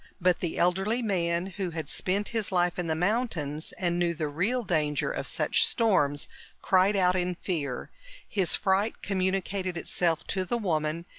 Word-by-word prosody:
But 180 -1 +2
the 175 - -3
elderly 195 +7 +1
man, 175 -4 0
who 190 -3 -1
had 160 -2 -5
spent 200 +3 0
his 225 -4 -2
life 180 -1 +1
in 175 - -2
the 160 - 0
mountains 170 - -1
and 175 -1 -1
knew 170 -1 +1
the 155 -1 -2
real 195 +12 0
danger 155 -6 0
of - - -3
such - - +2
storms, 145 - +2 0.3
cried 190 +2 +3
out 180 -2 +3
in 180 0 0
fear. 150 -8 -3 0.4
His 185 -5 +2
fright 195 +3 0
communicated 190 -1 -1
itself 165 -1 0
to 190 - 0
the 235 +6 -1
woman 165 -5 -1
180 Hz, 165 wpm, -28 LUFS, 165-195 Hz, 0.4 s, cried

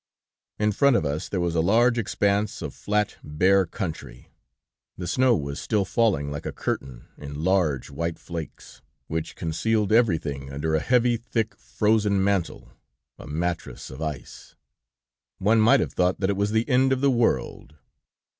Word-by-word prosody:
"In 105 0 +1
front 140 +5 +3
of 80 - +1
us, 75 +5 -3
there 95 - -2
was 85 -1 0
a 80 - +2
large 120 +7 +3
expanse 100 -1 0
of - - -5
flat, 105 0 -1
bare 95 +5 +2
country; 75 - -7 0.7
the 90 - -5
snow 125 +7 +3
was 70 -4 -4
still 105 -3 0
falling 95 - +1
like 75 0 -5
a - - -3
curtain, 65 -3 -4
in 75 +1 -7
large, 85 -8 +1
white 85 +3 -3
flakes, 80 -7 -8 0.2
which 80 0 -4
concealed 105 +6 0
everything 80 - +1
under 75 +3 -2
a 80 - +3
heavy, 120 +4 +2
thick, 115 -1 -2
frozen 105 -2 +1
mantle, 100 -3 -1 0.5
a - - -10
mattress 85 +1 -4
of 65 +4 -9
ice. 75 -6 -7 0.8
One 110 +3 +3
might 125 +5 +5
have - - -3
thought 90 0 +1
that 95 0 +1
it - - -1
was 100 +1 0
the 110 +1 +1
end 130 0 +3
of 130 -1 +1
the 140 -1 +4
world. 115 - -1
95 Hz, 165 wpm, -25 LUFS, 80-110 Hz, 0.8 s, might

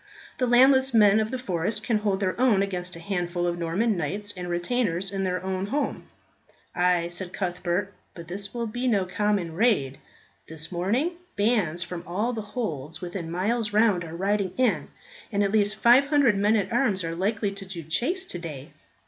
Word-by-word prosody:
The 250 - +2
landless 260 +1 +5
men 210 -1 +6
of 220 0 0
the 260 - -3
forest 190 -4 -1
can 225 -4 +1
hold 205 -2 -1
their 190 +5 -1
own 220 -7 +4
against 180 -2 -3
a - - -9
handful 175 -1 -2
of 175 0 -1
Norman 190 +7 0
knights 200 +6 -3
and 180 -1 -6
retainers 180 0 0
in 195 -1 -2
their 180 -1 -1
own 190 +1 -2
home." 285 +7 -2 0.7
"Ay," 175 -1 +2
said 180 +1 -4
Cuthbert, 185 +1 -2 0.2
"but 170 -1 -9
this 200 +4 -3
will 235 -1 -3
be 245 +3 -3
no 200 -6 +2
common 195 -3 -1
raid. 160 - +1 0.5
This 160 +1 -5
morning 235 - 0 0.2
bands 205 -6 +1
from 175 -2 -7
all 210 +8 -1
the 225 - -3
holds 165 - -5
within 175 -2 -5
miles 210 +5 -1
round 210 -5 +3
are 165 0 -8
riding 195 +1 0
in, 215 - +1 0.4
and 205 -1 +1
at 200 - 0
least 205 -1 +2
500 270 0 +5
men 205 +2 +3
at 215 +2 -1
arms 220 -7 +1
are 165 0 -3
likely 205 +4 -1
to 195 0 -7
do 185 -3 -7
chase 280 - 0
today." 160 - -6
195 Hz, 180 wpm, -26 LUFS, 175-225 Hz, 0.7 s, men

